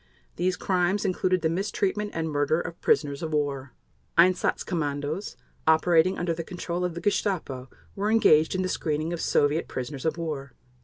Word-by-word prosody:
These 180 +1 0
crimes 185 +2 +1
included 185 -1 +1
the - - +4
mistreatment 200 +3 -1
and 165 0 -1
murder 145 +1 +1
of 170 -1 -6
prisoners 140 -2 +1
of 160 -2 -4
war. 140 -3 -1 0.4
Einsatz 180 +2 +3
Kommandos 150 +2 -3 0.3
operating 165 +3 +4
under 175 -1 0
the 165 0 -4
control 175 0 -4
of 180 -2 -2
the 170 - -5
Gestapo 170 -10 -1 0.3
were 200 +2 -1
engaged 160 -8 +4
in 185 - 0
the - - 0
screening 155 -1 -1
of 170 - -4
Soviet 145 +3 +2
prisoners 130 +1 -5
of 160 0 0
war. 145 -5 -4
165 Hz, 165 wpm, -26 LUFS, 150-185 Hz, 0.4 s, the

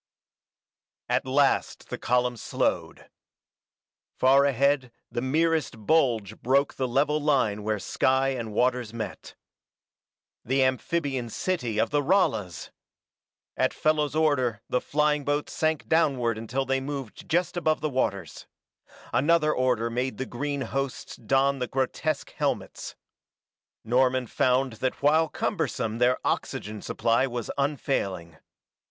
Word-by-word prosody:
At - - 0
last 135 +1 +1
the - - -4
column 125 0 +1
slowed. 115 - -2 1.1
Far 135 +2 +5
ahead 140 -1 +2 0.2
the 120 - -2
merest 150 -4 0
bulge 115 -9 +1
broke 140 +3 +2
the 130 - -2
level 145 +4 +1
line 130 -8 +1
where 105 0 -1
sky 130 +6 +1
and 120 -5 -4
waters 125 0 0
met. 110 -4 -6 1.1
The 130 +2 +2
amphibian 130 -1 -1
city 125 - -2
of - - +1
the 145 0 +2
Ralas! 115 - 0 0.8
At - - 0
Fellows' 155 -1 +1
order 130 -8 +1
the 125 - 0
flying 150 0 +1
boats 145 +1 -1
sank 155 -1 0
downward 135 -8 +2
until 120 +5 -3
they 135 0 0
moved 135 -4 -6
just 175 +2 +1
above 155 -3 +1
the 155 - 0
waters. 130 -8 -2 0.7
Another 155 +2 +3
order 125 -2 +1
made 125 -1 -2
the 130 - -3
green 140 +3 -3
hosts 135 -1 -4
don 135 +4 +1
the 125 - -2
grotesque 135 +4 -2
helmets. - - -3 0.9
Norman 125 +2 +2
found 130 +2 +1
that 130 +1 -2
while 160 +2 +4
cumbersome 115 - -2
their 125 +1 +3
oxygen 105 0 -2
supply 115 +3 +1
was 120 -3 -4
unfailing. 100 - -2
130 Hz, 125 wpm, -26 LUFS, 120-145 Hz, 1.1 s, Far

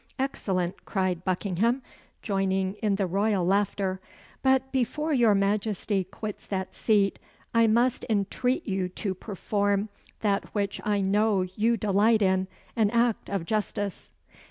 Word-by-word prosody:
"Excellent!" 190 -9 -2
cried 185 -3 -1
Buckingham, 200 +7 0 0.4
joining 195 -2 0
in 210 -2 +2
the 195 -1 0
royal 195 0 +1
laughter; 195 0 +1 0.4
"but 265 0 +2
before 300 +5 0
your 235 -6 +4
Majesty 200 0 0
quits 210 +2 -7
that 190 -2 -3
seat, 205 -3 +2 0.3
I 230 -1 +5
must 240 +3 +2
entreat 245 - 0
you 190 -2 -1
to 190 +1 -3
perform 200 +1 -1 0.3
that 200 -2 +1
which 200 -1 -1
I 205 -1 +1
know 200 0 +2
you 215 +6 0
delight 215 +2 +3
in 190 0 +2 0.3
an 220 -3 +3
act 235 0 +1
of 195 -4 -2
justice." 205 -1 -2
205 Hz, 130 wpm, -27 LUFS, 190-225 Hz, 0.4 s, I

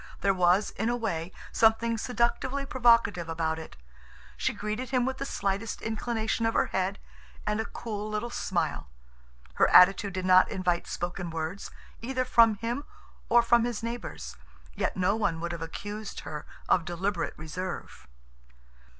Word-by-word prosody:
There 195 - +3
was, 180 +2 +3
in 220 +3 -1
a 240 - +1
way, 180 -7 -3 0.2
something 230 +1 +3
seductively 250 +4 0
provocative 230 -9 +3
about 160 0 -1
it. 160 - -10 0.6
She - - 0
greeted 215 +4 -4
him 255 -2 +2
with 265 0 -3
the 275 - -3
slightest 200 +3 -2
inclination 225 0 -1
of 225 - -1
her - - +4
head 190 +1 -1 0.5
and 210 +1 0
a - - -4
cool 215 -2 -5
little 215 +3 -3
smile. 160 - -2 0.6
Her - - +3
attitude 195 +2 +6
did 185 0 -3
not 185 0 +6
invite 180 -2 -1
spoken 175 0 -4
words, 165 +4 -4 0.3
either 255 +2 -1
from 230 -3 +5
him 235 +6 -3 0.5
or 240 0 +6
from 235 0 +4
his 235 -2 -3
neighbors, 215 - -5 0.4
yet - - -1
no 185 +3 +2
one 205 -7 0
would 170 +1 -3
have 170 -1 -6
accused 205 +6 -6
her 150 +1 -7 0.2
of 175 - +3
deliberate 175 +2 -2
reserve. 175 +4 -6
205 Hz, 155 wpm, -28 LUFS, 175-230 Hz, 0.6 s, attitude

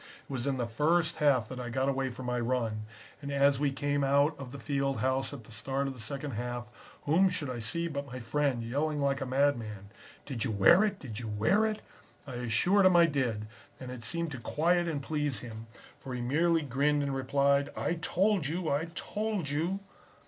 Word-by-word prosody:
It - - -7
was 130 +1 -2
in 135 -1 0
the 120 - 0
first 155 +8 +1
half 140 -7 +3
that 130 - -6
I 120 -1 -4
got 130 +3 0
away 135 -1 0
for 125 +1 -8
my 125 0 -1
run, 115 -3 -1 0.4
and 140 -1 -5
as 140 -1 +3
we 145 -1 +2
came 145 +1 0
out 140 +3 +3
of 130 -3 -7
the 140 - -7
field 135 +2 -1
house 130 0 +1
at 140 -5 -8
the 110 - -15
start 135 +6 -2
of 135 - -3
the 125 - -13
second 140 +6 -4
half, 120 +1 -4 0.4
whom 180 +6 +4
should 150 -7 -2
I 120 - -4
see 170 +9 -2
but 140 -3 -4
my 130 -1 -7
friend, 125 0 0
yelling 145 +6 -1
like 140 -1 +1
a 135 - -2
madman 120 -7 0 0.4
"'Did 130 -6 -3
you - - -1
wear 110 - +6
it? 205 -2 0
Did 120 - -7
you 120 - -5
wear 110 - +2
it?' 215 -1 -4 0.4
"I 135 - -8
assured 125 - +3
him 185 - +4
I 170 -1 +8
did, 125 -9 -1 0.3
and 130 -1 -7
it 125 -2 -8
seemed 170 +7 -1
to 135 - -6
quiet 175 +7 +1
and 145 -4 -2
please 150 -3 -1
him, 115 -2 -8 0.3
for 130 -2 -6
he 125 - -3
merely 165 +6 +2
grinned 145 +2 +1
and 140 -1 -1
replied: 140 +1 +2
"'I 170 - -1
told 190 -2 +2
you! 165 +1 -2
I 145 +3 +1
told 210 -7 -2
you!' 170 +7 -1
140 Hz, 215 wpm, -30 LUFS, 125-155 Hz, 0.4 s, I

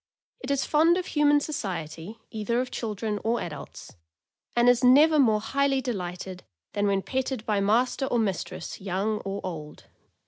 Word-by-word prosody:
It - - -7
is 280 -1 +1
fond 325 +3 +4
of 365 - -2
human 295 -2 +3
society, 185 - -5
either 220 +2 -1
of 255 0 -2
children 215 -1 -3
or 230 +2 +1
adults, 155 -4 -8 0.6
and 240 0 +4
is 245 0 +4
never 295 +5 +6
more 220 -6 +4
highly 275 +5 +1
delighted 185 -6 -5 0.3
than 205 0 +1
when 195 -1 +1
petted 260 -3 -2
by 210 -2 +1
master 240 +6 +1
or 245 - 0
mistress, 200 -4 -3
young 200 +3 -1
or 195 +1 -5
old. 155 -4 -7
225 Hz, 160 wpm, -26 LUFS, 195-265 Hz, 0.6 s, never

